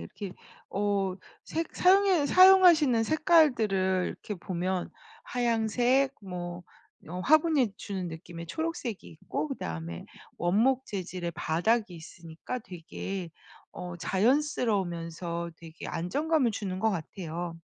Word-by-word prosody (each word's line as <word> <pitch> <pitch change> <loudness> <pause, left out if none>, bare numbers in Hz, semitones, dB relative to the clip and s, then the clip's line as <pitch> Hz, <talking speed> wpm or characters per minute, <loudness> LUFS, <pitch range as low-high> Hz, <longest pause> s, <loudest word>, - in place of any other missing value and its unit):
이렇게 180 - -7 0.4
어 200 -2 0 0.3
색 330 +1 -4
사용에 370 -4 +4
사용하시는 350 -9 +7
색깔들을 225 - +3
이렇게 210 - -6
보면 180 0 -3 0.3
하얀 230 -3 0
색 260 +5 +2
뭐 175 -2 -6 0.5
어 180 +2 -5
화분이 300 - +3
주는 190 -3 -5
느낌의 165 +1 -8
초록색이 320 - -4
있고 160 - -4
그다음에 85 - -5 0.3
원목 235 +9 +2
재질의 180 -3 -4
바닥이 180 +6 0
있으니까 165 +7 -8
되게 185 -2 -6 0.4
어 175 -1 -7
자연스러우면서 180 - 0
되게 165 -1 -10
안정감을 280 - 0
주는 190 -3 -4
것 220 - +3
같아요. 170 -1 -5
195 Hz, 270 characters per minute, -29 LUFS, 175-260 Hz, 0.5 s, 사용하시는